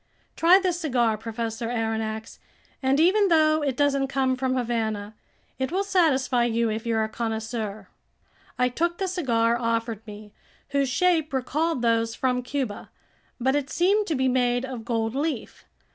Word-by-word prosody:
"Try 345 +3 +6
this 365 -3 0
cigar, 240 -9 +1
Professor 225 +1 -4
Aronnax, 225 -1 -3 0.4
and 265 +1 +2
even 390 +5 +4
though 310 -2 +4
it 275 -4 -1
doesn't 275 -1 +2
come 265 -1 +1
from 255 0 -1
Havana, 220 -4 -2 0.5
it 260 0 -1
will 385 +3 0
satisfy 275 -11 +2
you 230 -1 +1
if 220 +2 -4
you're 225 -1 +1
a - - -1
connoisseur." 220 -1 -4 0.7
I 250 - +3
took 340 +7 -1
the 385 - -1
cigar 240 -10 +1
offered 230 -2 -1
me, 210 0 -10 0.4
whose 280 -1 +1
shape 320 +1 +2
recalled 280 +2 -1
those 230 -1 +1
from 250 -1 0
Cuba; 250 -4 -4 0.5
but 265 +3 +1
it 285 -2 -1
seemed 400 +4 +2
to 320 - 0
be 260 0 +1
made 250 0 +1
of 250 -4 -7
gold 225 -1 -1
leaf. 280 -3 -3
250 Hz, 160 wpm, -25 LUFS, 230-295 Hz, 0.7 s, Try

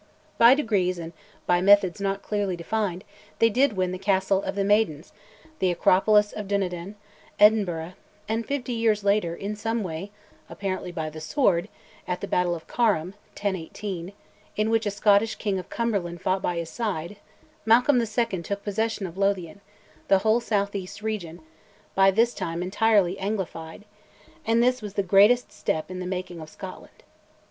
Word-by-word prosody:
By 235 +3 +8
degrees 200 -10 0
and 165 0 -7 0.3
by 175 0 +2
methods 200 -1 +4
not 195 0 -2
clearly 205 -3 -1
defined 185 +1 -2 0.3
they 230 0 +4
did 255 +2 +3
win 185 -2 -1
the 185 - -5
Castle 190 0 +1
of - - -4
the 200 - 0
Maidens, 195 -6 +1 0.5
the 185 - +2
acropolis 205 +4 +3
of 210 -2 -6
Dunedin, 190 -1 -2 0.4
Edinburgh; 185 -6 +3 0.3
and 225 +2 -1
fifty 255 -2 -3
years 225 -3 +1
later, 200 -4 +1
in 200 +4 -5
some 225 +1 -2
way, 175 +2 -5 0.4
apparently 185 -2 -4
by 160 -3 -4
the 155 0 -9
sword, 175 - +1 0.4
at 180 0 -2
the - - -5
battle 180 -1 +1
of 165 - -10
Carham 205 -9 +1 0.3
(1018), 190 -1 -4 0.4
in 215 +1 0
which 225 -1 +1
a - - +2
Scottish 205 +2 +3
king 200 -3 -2
of 180 - -9
Cumberland 200 -7 -2
fought 185 +2 0
by 175 -2 -1
his 165 -1 -4
side, 205 -5 -3 0.5
Malcolm 245 +4 +4
II. 230 -4 -1
took 200 +4 -5
possession 215 0 -2
of 180 +1 -8
Lothian, 195 -2 -1 0.5
the 195 - +5
whole 220 +2 +4
south 205 -4 -1
east 200 +1 -6
region, 180 -6 -4 0.5
by 195 0 +5
this 230 +5 +2
time 165 +1 -3
entirely 195 -1 +2
anglified, 190 -4 -4 0.6
and 230 +1 +3
this 250 0 +2
was 205 -2 -7
the 200 - +1
greatest 205 +5 +4
step 170 -4 -3
in 185 - -5
the 180 - -4
making 180 -2 -5
of 155 - -9
Scotland. - - -11
200 Hz, 165 wpm, -25 LUFS, 180-215 Hz, 0.6 s, By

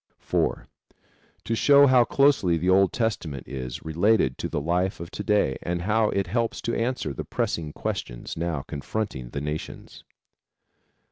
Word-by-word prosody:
(4) - - -1 0.8
To 115 - -2
show 140 +4 +6
how 130 -3 +6
closely 135 -13 +3
the 90 +3 +1
Old 95 0 +4
Testament 90 - -2
is 65 -2 -6
related 80 - +2
to - - -3
the - - -1
life 90 +5 0
of 85 0 -8
to 105 - -5
day 105 -10 +1
and 85 0 -3
how 110 +2 +2
it 100 -1 0
helps 115 -1 -1
to 115 - -2
answer 115 - -1
the - - -5
pressing 80 -3 -2
questions - - -5
now 80 -4 -2
confronting 70 - -4
the 70 - -5
nations. 75 +1 -6
90 Hz, 155 wpm, -25 LUFS, 75-110 Hz, 0.8 s, show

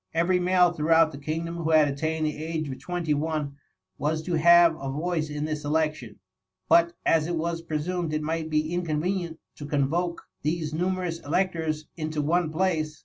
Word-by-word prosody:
Every 175 +2 +2
male 180 -1 +4
throughout 165 0 +3
the 140 - -9
kingdom 165 +3 -3
who 165 -1 -2
had 155 -2 +5
attained 155 +3 -1
the 150 - -1
age 160 -1 -3
of 130 -1 -6
twenty 170 +1 -2
one, 150 -2 -2 0.4
was 155 +2 -1
to 175 - -3
have 170 0 +6
a 135 - -5
voice 155 +2 -2
in 150 0 -3
this 155 -1 -3
election; 150 -5 -1 0.5
but 170 0 +5
as 160 -1 +3
it 175 - -1
was 165 +1 -2
presumed 165 +1 -2
it 155 0 -1
might 160 +1 -2
be 155 +1 0
inconvenient 170 0 -2 0.2
to 145 - -7
convoke 160 +5 -1 0.2
these 155 0 -2
numerous 180 0 -1
electors 160 -1 -1
into 155 -1 -3
one 160 +3 +1
place. 160 -3 -1
160 Hz, 175 wpm, -26 LUFS, 150-170 Hz, 0.5 s, have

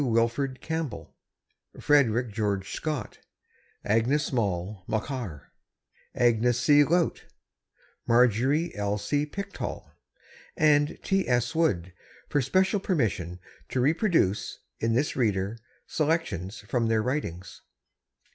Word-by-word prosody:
Wilfred 120 +2 0
Campbell, 160 -8 -4 0.6
Frederick 125 -6 +3
George 100 -3 -2
Scott, 150 -9 -4 0.7
Agnes 125 +8 +1
Maule 100 -4 -2
Machar, 110 - -4 0.6
Agnes 120 0 +3
C. 145 +3 +6
Laut, 170 +4 +1 0.8
Marjorie 125 +7 +3
L. 105 0 -1
C. 145 +9 -1
Pickthall, 200 +6 -6 0.7
and 150 -1 +3
S. 125 -11 +1
T. 160 - -3
Wood, 90 - +1 0.4
for 145 - +2
special 190 - +2
permission 105 - -1 0.3
to 130 - -1
reproduce, 150 - +1 0.2
in 115 0 +1
this 140 +5 0
Reader, 105 -2 0 0.3
selections 120 - -1
from 115 +2 -1
their 110 -1 +2
writings. 105 - -4
120 Hz, 100 wpm, -27 LUFS, 105-150 Hz, 0.8 s, C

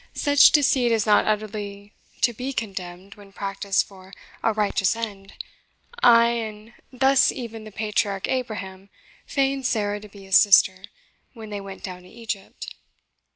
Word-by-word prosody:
Such 285 -1 +5
deceit 270 -5 +3
is 225 -2 +1
not 210 -1 +3
utterly 205 -1 -4 0.3
to 240 - +3
be 255 +4 -5
condemned 190 -4 -6
when 200 -2 -16
practised 195 0 -1
for 190 -1 -16 0.3
a 225 - +2
righteous 210 -1 0
end; 205 -4 -7 0.7
and 230 -2 +3 0.2
thus 265 +1 +3
even 230 -4 -8
the 215 - -10
patriarch 205 -2 -2
Abraham 200 -6 -4 0.4
feigned 270 -1 0
Sarah 205 -3 -1
to 210 0 -13
be 200 -1 -14
his 190 -1 +5
sister 190 -2 +4 0.5
when 220 -3 -10
they 205 -1 -5
went 195 -1 -10
down 180 -2 -7
to 180 - -17
Egypt." 225 -3 -7
210 Hz, 145 wpm, -23 LUFS, 195-230 Hz, 0.7 s, Such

